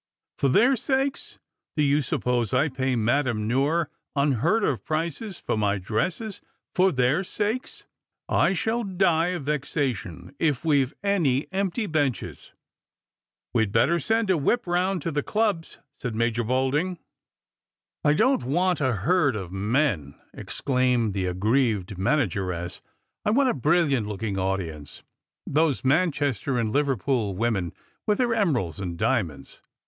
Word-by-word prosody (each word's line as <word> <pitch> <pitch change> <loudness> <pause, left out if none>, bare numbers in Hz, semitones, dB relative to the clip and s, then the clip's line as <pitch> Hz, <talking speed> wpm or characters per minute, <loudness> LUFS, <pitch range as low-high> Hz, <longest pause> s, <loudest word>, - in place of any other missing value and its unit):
" - - -65
For 140 - +2
their 240 - +5
sakes! 265 +2 -1 0.4
Do 150 - +3
you 145 +1 +3
suppose 125 -3 0
I 150 - +3
pay 130 -1 -1
Madame 115 -1 +1
Noire 145 +7 +1 0.3
\in 140 +1 +3
heard 170 - +1
of 135 - 0
prices 165 +5 -3
for - - -2
my 105 -1 +1
dresses 165 - -2 0.3
for 185 +1 +4
their 130 +5 +2
sakes? 215 +6 -3 0.4
I 190 - +3
shall 225 +6 -1
die 180 -4 +2
of 180 -4 -3
vexation 135 - -3
if 150 -3 0
we've 140 -4 +3
any 160 -10 +2
empty 195 +3 -1
benches." 145 - -2 0.5
" - - -67
We'd 110 -4 +2
better 140 +11 +3
send 225 +3 +1
a 180 - +3
whip 235 - +1
round 180 -1 0
to 165 - -2
the 145 0 0
clubs," 205 -3 -1 0.2
said 120 -4 -4
Major 115 +1 0
Dolding. 135 +9 0 1.1
"I 150 - +4
don't 255 - +3
want 175 +5 +1
a 130 -2 +2
herd 155 -7 +3
of 95 -4 -5
men," 100 - 0 0.2
exclaimed 125 -5 0
the 95 -2 -1
aggrieved 105 +1 0
manageress; 95 - -1 0.2
" - - -54
I - - +1
want 260 +4 +3
a - - +2
brilliant 145 -5 +2
looking 105 -1 -3
audience, 95 -6 -4 0.2
— - - -67
those 150 -2 +1
Man 160 +7 +3
chester 135 -3 -1
and 115 -2 0
Liverpool 130 -6 0
women 100 -5 0 0.4
with 210 -1 +3
their 240 -2 +1
emeralds 135 - 0
and 90 -3 -4
diamonds. 95 - -2
140 Hz, 150 wpm, -25 LUFS, 110-175 Hz, 1.1 s, their